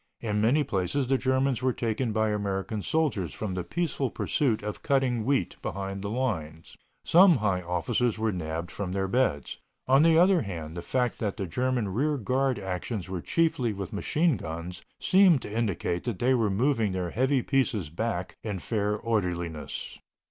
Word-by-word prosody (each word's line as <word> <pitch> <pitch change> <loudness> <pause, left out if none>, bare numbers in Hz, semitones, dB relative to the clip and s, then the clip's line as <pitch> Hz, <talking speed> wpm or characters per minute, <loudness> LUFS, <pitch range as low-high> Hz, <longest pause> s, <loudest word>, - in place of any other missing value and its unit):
In 105 -2 -1
many 130 +8 +3
places 105 +2 -1
the 135 +2 +2
Germans 130 -1 +1
were 130 -1 +1
taken 115 +1 -1
by 110 0 +1
American 100 0 -2
soldiers 110 - -1
from 105 -4 -4
the 90 -1 -2
peaceful 140 - -1
pursuit 115 -2 0
of 105 0 -5
cutting 130 -5 +1
wheat 135 -9 0
behind 95 +1 -4
the 100 - -4
lines. 85 -10 -3 0.3
Some 180 0 +7
high 100 -5 0
officers 90 +7 0
were 110 0 0
nabbed 85 -2 -4
from 95 -3 -4
their 95 0 0
beds. 95 - 0 0.3
On 135 +2 +5
the 160 0 +5
other 180 0 +5
hand, 80 - -6
the 85 - -4
fact 125 +3 -1
that 105 -3 -2
the 100 - -2
German 125 +5 -1
rear 145 +9 0
guard 130 +2 0
actions 95 0 -4
were 90 -2 -3
chiefly 140 - +1
with 100 -2 -6
machine 155 +8 +1
guns 85 +2 -6 0.2
seemed 185 -8 +5
to 105 - -7
indicate 100 -6 -1
that 120 -6 -2
they 125 +6 +2
were 115 -4 +2
moving 110 -1 +1
their 90 -2 -2
heavy 130 +1 +1
pieces 125 - 0
back 95 0 -3
in 105 -3 -3
fair 105 +1 -1
orderliness. 90 -9 -3
110 Hz, 175 wpm, -27 LUFS, 95-130 Hz, 0.3 s, Some